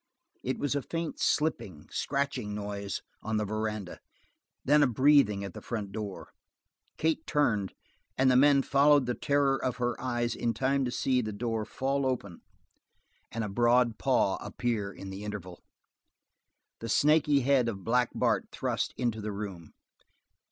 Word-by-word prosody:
It 130 - -2
was 145 - -1
a 145 - 0
faint 165 +4 -4
slipping, 100 - -1
scratching 135 -7 -2
noise 100 -1 -4 0.2
on 110 0 -2
the 105 - 0
veranda; 110 -2 -4 0.7
then 150 +2 +5
a 145 - +5
breathing 125 -5 +4
at 100 -3 -6
the - - -9
front 105 -5 -4
door. 105 -2 -6 0.7
Kate 160 0 0
turned, 105 - +1 0.4
and 130 0 +4
the - - +4
men 140 +1 +5
followed 140 0 +4
the 125 - -1
terror 140 0 +1
of 125 -1 -1
her 120 -1 0
eyes 120 -2 -1
in 115 -1 -1
time 135 +3 +1
to - - -1
see 130 0 +1
the 110 -2 -4
door 110 +1 -2
fall 135 +3 -1
open, 100 -9 -3 0.9
and 115 0 -3
a - - -2
broad 120 +2 +2
paw 125 -7 +2
appear 105 -1 -3
in 95 0 -9
the 95 +2 -7
interval. 100 -4 -7 1.2
The 115 - -6
snaky 150 +1 +4
head 130 -2 +3
of 95 -4 -6
Black 125 +3 +2
Bart - - +1
thrust - - -2
into 120 -3 -1
the 105 0 -3
room. 100 -5 -7
120 Hz, 160 wpm, -29 LUFS, 105-135 Hz, 1.2 s, then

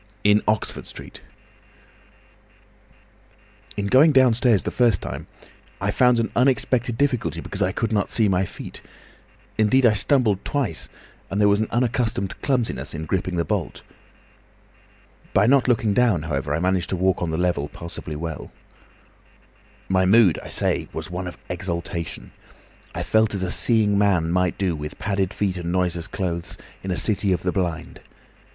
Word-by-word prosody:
IN 105 +1 +5
OXFORD 105 -1 -1
STREET - - -11 2.6
"In 100 - -1
going 135 +9 +5
downstairs 125 -5 +4
the - - -3
first 115 -7 +3
time - - -7 0.5
I - - 0
found 125 -2 +3
an 115 - -1
unexpected 125 -2 +1
difficulty 140 -4 0
because - - -5
I 90 - +2
could 115 +2 -2
not 100 -2 0
see 110 -2 +2
my 95 -1 +2
feet; - - -8 0.8
indeed 125 +5 +4
I 115 - +6
stumbled 110 -3 +2
twice, 130 - -2 0.4
and 100 - -2
there 105 - +5
was 100 0 +3
an 110 - 0
unaccustomed 115 -5 -1
clumsiness 115 - -1
in 80 +1 -5
gripping 90 +2 -2
the 85 -1 0
bolt. - - -3 1.5
By 100 - +5
not 135 +2 +4
looking 115 -4 +2
down, 105 -8 +2
however, 75 -2 -2
I - - -1
managed 90 0 0
to - - -1
walk 95 +1 +1
on 85 - -1
the 80 - -2
level 85 -5 0
passably 85 -2 -7
well. 80 +1 -6 1.4
"My 95 -1 +2
mood, 105 -3 +5
I - - -10
say, - - 0
was - - -6
one 90 +1 -4
of 85 -1 -8
exaltation. 85 -2 -5 0.6
I - - -2
felt 110 -1 +2
as 95 - -2
a 90 - -2
seeing 105 -4 +2
man 90 -5 +2
might 90 -1 +1
do, 95 -4 0
with 75 0 -7
padded 100 -2 -1
feet 100 -3 -2
and 85 -1 -4
noiseless 90 -2 0
clothes, 85 -3 -4 0.2
in 95 - -6
a 90 - -1
city 100 +2 +1
of 90 -1 0
the 90 - 0
blind. 90 -4 -3
95 Hz, 160 wpm, -23 LUFS, 90-115 Hz, 2.6 s, I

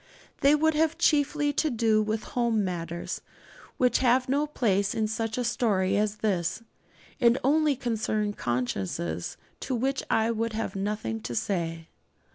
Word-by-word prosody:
They 280 +2 +5
would 315 +1 +2
have 320 +1 +1
chiefly 295 -2 +2
to 310 - +1
do 225 -3 +2
with 215 0 -2
home 235 -4 0
matters 170 -1 -4 0.6
which 250 -1 +3
have 255 0 +3
no 285 +3 +1
place 200 -9 0
in 220 -1 +1
such 220 +1 -2
a 250 - 0
story 205 -5 +1
as 210 0 +1
this, 190 +1 0 0.6
and 235 +1 +5
only 300 +2 +3
concern 220 -4 -1
consciences 95 - -3 0.2
to 260 - -2
which 265 +3 0
I 225 +1 +2
would 230 0 -2
have 220 -1 -3
nothing 195 - -2
to 115 +2 -5
say. 165 - -2
220 Hz, 150 wpm, -27 LUFS, 195-260 Hz, 0.6 s, They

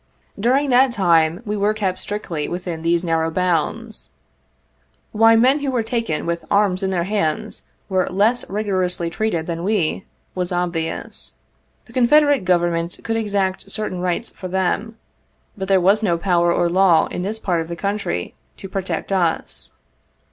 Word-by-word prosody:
During 265 +6 +2
that 255 +1 +5
time, 170 -3 +2
we 210 0 -2
were 210 +1 +1
kept 195 -4 -1
strictly 180 -7 -4
within 175 -2 -4
those 170 +1 +1
narrow 165 -1 +1
bounds. 185 +6 -1 1.0
Why 225 +1 +5
men 255 +6 +4
who 285 -1 -2
were 245 -3 0
taken 225 -9 -2
with 170 -1 -2
arms 200 -2 +2
in 190 - 0
their 180 -3 0
hands 205 +2 -2 0.2
were 185 -2 +1
less 210 +6 +1
rigorously 185 -4 -1
treated 190 -6 -1
than 170 0 -4
we, 190 -3 0 0.3
was 180 -1 -2
obvious. 175 -2 -3 0.5
The - - -17
Confederate 280 -2 +4
Government 175 -1 +1
could 225 - -1
exact 200 -3 -1
certain 195 -3 -3
rights 180 +5 -1
for 185 - -8
them, 190 +5 -1 0.6
but 190 -1 -5
there 195 0 +4
was 195 +4 +3
no 175 -6 +1
power 175 -1 +2
or 175 - +2
law 175 -1 +4
in - - -3
this 205 +4 -3
part 180 -6 0
of 165 - -6
the 170 - -5
country, 195 - -3 0.2
to 195 - -8
protect 190 +1 -4
us. 175 -4 -1
190 Hz, 160 wpm, -21 LUFS, 170-215 Hz, 1.0 s, that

